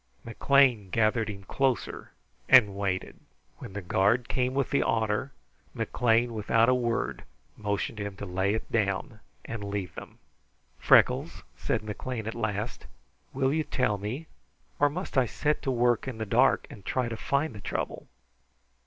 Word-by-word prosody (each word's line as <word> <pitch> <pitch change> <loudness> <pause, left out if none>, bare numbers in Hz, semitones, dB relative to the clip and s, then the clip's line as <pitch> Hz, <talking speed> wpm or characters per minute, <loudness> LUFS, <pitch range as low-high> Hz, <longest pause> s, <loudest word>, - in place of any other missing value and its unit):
McLean 120 -3 +3
gathered 110 +1 +1
him 100 -1 -7
closer 135 +4 -1 0.4
and 100 -2 +7
waited. 100 -2 -3 0.4
When - - -9
the 100 -1 -5
guard 105 +7 +2
came 125 0 -1
with 140 -1 0
the 140 - +3
otter, 110 +3 0 0.4
McLean 120 0 +1
without 115 +1 +2
a - - +5
word 120 -2 -1 0.3
motioned 105 +1 -3
him 100 -1 -4
to 100 - -7
lay 95 +2 0
it 110 - -6
down 110 0 -1 0.3
and 115 -3 -5
leave 100 -4 -4
them. - - -10 0.6
"Freckles," - - +3
said - - -2
McLean 110 +2 -5
at 110 - -3
last, 110 0 -3 0.4
"will 135 +1 +1
you 160 0 +1
tell 110 -8 0
me, 115 +11 -4 0.5
or 145 - +4
must 165 -2 -1
I 125 - +2
set 150 +6 -1
to 140 - -2
work 120 0 +2
in 130 -4 -5
the 110 - -3
dark 120 +6 +3
and 100 - -12
try 125 +4 -1
to 115 - -4
find 140 +6 -1
the 105 - -10
trouble?" - - -4
115 Hz, 160 wpm, -28 LUFS, 105-130 Hz, 0.6 s, and